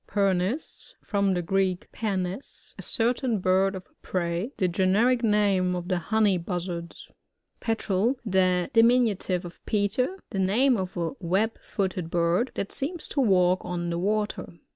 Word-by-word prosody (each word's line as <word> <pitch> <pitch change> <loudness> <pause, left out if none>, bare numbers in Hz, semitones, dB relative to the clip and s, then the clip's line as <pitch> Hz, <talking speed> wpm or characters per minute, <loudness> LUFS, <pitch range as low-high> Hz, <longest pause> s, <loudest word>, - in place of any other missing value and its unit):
Pernis. 195 - -1
— - - -49
From 200 -2 +2
the 175 - -1
Greek, 190 0 0
pernes^ 195 +1 -3
a - - -9
certain 235 0 0
bird 190 +1 +2
of 185 - -8 0.2
Prey, 175 +5 -2
fhe 185 -2 +1
generic 215 +8 +2
name 200 -4 +2
of 175 +1 -5
the 180 -2 +1
Honey 205 0 +2
Buzzards. 170 -1 -5 0.5
Petrel.— 225 +1 0
The 185 -3 +2
diminutive 225 -6 +3
of 175 - -11
Peter. 220 - 0
The 195 - -2
name 235 +8 +3
of 190 -3 -4
a 170 -1 -1
web 195 +6 0
footed 185 -4 -3
bird, 170 +8 +1
that 200 - -3
seems 315 +5 -3
to 280 - 0
walk 185 -5 +3
on 175 -1 -3
the 170 - -2
water. 210 +1 -1
195 Hz, 150 wpm, -26 LUFS, 180-220 Hz, 0.5 s, diminutive